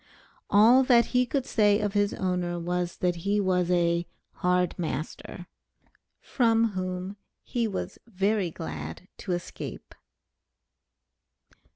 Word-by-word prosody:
All 230 +6 +6
that 240 -2 +5
he 250 0 +3
could 270 0 -1
say 205 -4 +3
of 205 -2 -1
his 205 -1 +2
owner, 180 -2 -1
was, 175 0 -2
that 180 -1 0
he 200 +5 0
was 180 -3 +1
a 170 -1 +2 0.2
"hard 180 0 +1
master," 165 +2 -5 0.7
from 230 -2 +2
whom 185 +1 -4 0.3
he 235 -2 -1
was 200 - -5
very 200 -2 0
glad 80 - -7
to 185 - -3
escape. 175 0 -6
185 Hz, 115 wpm, -27 LUFS, 175-210 Hz, 0.7 s, All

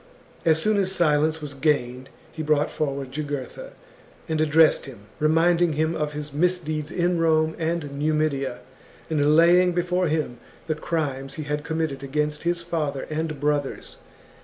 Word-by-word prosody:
As 160 -1 +5
soon 215 +5 +2
as 190 -1 +1
silence 155 -3 +2
was 145 -1 -6
gained 130 -3 -1 0.2
he 160 - -6
brought 150 -1 +1
forward 140 -3 -3
Jugurtha 150 - -5 0.5
and 160 -2 0
addressed 155 -1 +4
him, 125 -7 -11 0.2
reminding 165 +2 +3
him 160 +2 0
of 150 -2 -2
his 150 -1 -6
misdeeds 155 -2 0
in 175 -1 0
Rome 160 -1 +2
and 160 -4 -2
Numidia, 145 -4 0 0.5
and 150 -1 +3
laying 175 +2 +5
before 180 +1 0
him 150 -6 -2 0.3
the 160 - 0
crimes 145 -4 -3
he 155 - -5
had 150 0 -3
committed 160 -4 -2
against 150 +2 -2
his 170 0 -1
father 150 -5 -2
and 155 -1 -3
brothers. 145 -1 -2
155 Hz, 150 wpm, -24 LUFS, 145-165 Hz, 0.5 s, As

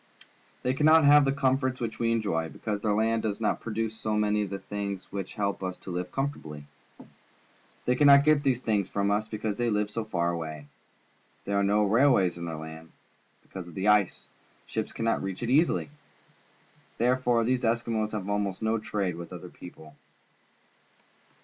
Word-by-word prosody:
They 125 - +1
cannot 155 +2 +5
ha\'e 145 +1 +7
the 135 - +2
comforts 130 -1 0
which 110 -2 -4
we 115 -1 +1
enjoy, 100 -8 -1
because 105 +2 -4
their 105 -1 +1
land 110 +1 +1
does 105 -2 -2
not 110 - 0
produce 110 0 -3
so 110 -1 -2
many 105 0 +1
of 100 - -3
the 100 - -4
things 100 -1 -5
which 95 -2 -5
help 100 -1 -2
us 95 -1 -4
to 95 - -9
live 90 +1 -4
comfortably. 80 - -4 1.2
They 125 - +3
cannot 140 0 +7
get 155 -1 +4
these 130 -3 +1
things 105 -5 0
from 100 0 0
us, 105 +1 0
be 110 - -5
cause 105 0 -3
they 120 -1 +1
live 105 -1 0
so 115 +1 -3
far 85 -5 -1
away. 80 -3 -5 0.8
There 100 - -1
are 100 - +3
no 105 +2 +3
railways 105 -4 +3
in 85 - -5
their 80 -1 -4
land. 80 +1 -9 0.5
Because 95 -2 -9
of 85 - -12
the 95 +2 +1
ice, 105 -3 +2 0.4
ships - - -4
cannot 115 0 -1
reach 95 +2 -5
it 120 - -1
easily. 150 0 +2 1.1
Therefore 125 -1 +2
these 125 +2 +1
Eskimos 115 -2 0
have 100 -3 -4
almost 100 -1 -2
no 110 +1 +1
trade 100 -5 -2
with 85 0 -8
other 90 0 -8
people. 80 -4 -13
105 Hz, 180 wpm, -28 LUFS, 95-120 Hz, 1.2 s, ha\'e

